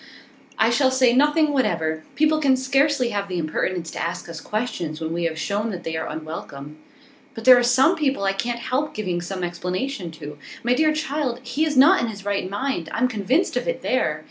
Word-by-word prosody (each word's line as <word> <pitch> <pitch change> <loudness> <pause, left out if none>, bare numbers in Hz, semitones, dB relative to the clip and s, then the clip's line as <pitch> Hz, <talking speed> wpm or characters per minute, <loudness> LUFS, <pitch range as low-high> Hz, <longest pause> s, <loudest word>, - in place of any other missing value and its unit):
'I 225 +1 +3
shall 260 +2 +3
say 260 -2 +3
nothing 295 +3 +3
whatever. 160 - 0
People 310 +1 +3
can 270 -3 +4
scarcely 270 0 +2
have 200 -2 -2
the 180 -2 -4
impertinence 165 +1 -2
to - - -5
ask 170 +1 -4
us 165 -1 -7
questions 175 -8 -3
when 160 0 -3
we 170 0 -1
have 160 -1 -2
shown 205 +7 -2
that 180 -4 -6
they 165 - -4
are 160 - -3
unwelcome.' 155 -2 -8 0.6
'But 225 -1 -8
there 255 - +10
are - - +2
some 260 +8 +4
people 275 -9 0
I 195 0 +1
can't 235 +5 -2
help 275 +5 -2
giving 180 -5 -2
some 185 +1 -5
explanation 180 +4 -3
to. 150 -2 -9 0.2
My 240 +2 +2
dear 310 +4 +3
child, 290 -5 -2
he 265 +6 -1
is 300 -3 -1
not 310 +9 +6
in 235 - 0
his 205 -3 -8
right 200 -2 -1
mind. 205 -5 -3
I'm 255 - +1
convinced 250 - 0
of - - -1
it, - - -2
there! - - 0
225 Hz, 210 wpm, -23 LUFS, 175-270 Hz, 0.6 s, there